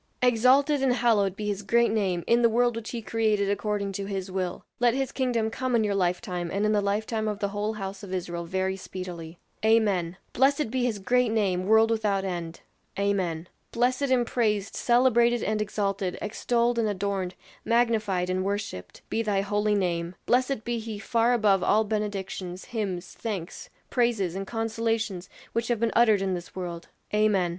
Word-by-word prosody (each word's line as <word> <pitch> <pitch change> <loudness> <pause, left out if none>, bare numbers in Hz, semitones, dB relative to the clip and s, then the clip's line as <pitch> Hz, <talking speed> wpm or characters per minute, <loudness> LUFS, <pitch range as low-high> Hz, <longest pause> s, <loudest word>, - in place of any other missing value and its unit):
"Exalted 260 +4 +4
and 265 -2 +3
hallowed 215 -6 +2
be 210 - -5
his 205 -1 -2
great 235 +3 +3
name 190 -6 0
in 235 +1 +3
the 235 - +5
world 240 +1 +2
which 230 -1 -5
he 235 -2 -5
created 215 -3 +1
according 205 -1 -1
to 195 +1 -4
his 195 -1 -4
will; 185 -2 -3
let 240 0 +3
his 270 -1 -1
kingdom 235 -4 0
come 255 +1 -1
in 225 - +3
your 205 -1 0
lifetime, 180 -1 -1
and 200 +2 0
in 215 - +2
the 210 -1 +2
lifetime 215 +2 -1
of 210 -1 -2
the 200 0 -1
whole 205 +2 -2
house 195 -2 -6
of 200 -3 -9
Israel 175 -2 -3
very 190 +2 -1
speedily!" 180 -3 -7 0.3
"Amen!" 200 -6 +2 0.2
"Blessed 275 -1 +2
be 255 -1 0
his 235 -4 0
great 245 +4 +2
name, 190 -4 0
world 220 +1 +5
without 205 -3 0
end." 170 -3 -5 0.4
"Amen!" 185 -5 -1 0.2
"Blessed 255 +3 +1
and 250 -2 +3
praised, 210 -4 0
celebrated 240 -1 +3
and 215 0 0
exalted, 200 -3 -2
extolled 235 +2 0
and 225 - +2
adorned, 195 -2 -2 0.3
magnified 220 -6 +1
and 185 0 -1
worshipped, 200 - -4
be 225 - -1
thy 205 -3 +1
holy 210 +1 +1
name; 175 -2 -1
blessed 255 -1 +1
be 235 0 -2
he 220 -1 -6
far 230 +3 +1
above 210 -6 +3
all 215 +4 +3
benedictions, 200 -4 -4
hymns, 190 -6 -4
thanks, 195 -7 -5 0.2
praises, 230 -8 +1
and 195 +1 -5
consolations 225 -4 -2 0.2
which 230 0 -1
have 240 -3 0
been 230 0 +1
uttered 220 -4 +5
in 190 -1 0
this 175 -1 -6
world." 175 -2 -5 0.3
"Amen!" 210 -4 +3
210 Hz, 180 wpm, -27 LUFS, 190-230 Hz, 0.4 s, the